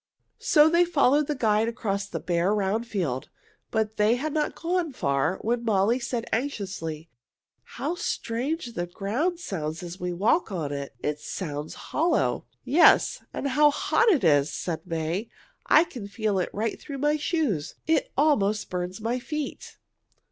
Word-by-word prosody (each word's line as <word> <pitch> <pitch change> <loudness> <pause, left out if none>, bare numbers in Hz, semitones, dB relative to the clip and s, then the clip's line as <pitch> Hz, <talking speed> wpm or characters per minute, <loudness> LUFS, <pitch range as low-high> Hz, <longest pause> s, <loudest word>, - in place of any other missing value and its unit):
So 300 -1 +5
they 340 +2 +5
followed 295 -4 +3
the 300 - -1
guide 220 -3 +2
across 200 -4 -2
the - - -4
bare, 175 +3 +1
round 210 +3 0
field. 165 - -2 0.4
But 220 -1 -1
they 210 +3 +4
had 290 +4 -3
not 305 -1 0
gone 340 -2 -1
far 140 - 0
when 235 +1 0
Molly 220 +2 +2
said 240 -1 -3
anxiously, 190 - -3 0.7
"How - - -1
strange 255 -3 -3
the 175 -3 -3
ground 245 - -1
sounds 160 - -4
as 175 +2 -7
we 180 0 -2
walk 215 - +1
on 160 -6 -3
it! 140 -4 -5
It 150 0 -1
sounds 150 -1 -5 0.2
hollow." 330 +2 +1 0.2
"Yes, 280 +7 +5
and 280 - -2
how 295 +3 +5
hot 450 +10 +2
it 310 - +3
is!" 145 -3 +4
said 165 +2 -4
May. 165 +6 -2 0.4
"I 310 - +7
can 250 -12 -8
feel 205 -1 -1
it 180 - -1
right 220 +3 -3
through 280 - -6
my 295 +2 +2
shoes. 295 - -1
It 410 +11 +1
almost 215 -9 +2
burns 180 +2 -3
my 235 +3 -1
feet." 300 +3 -5
220 Hz, 160 wpm, -26 LUFS, 180-290 Hz, 0.7 s, I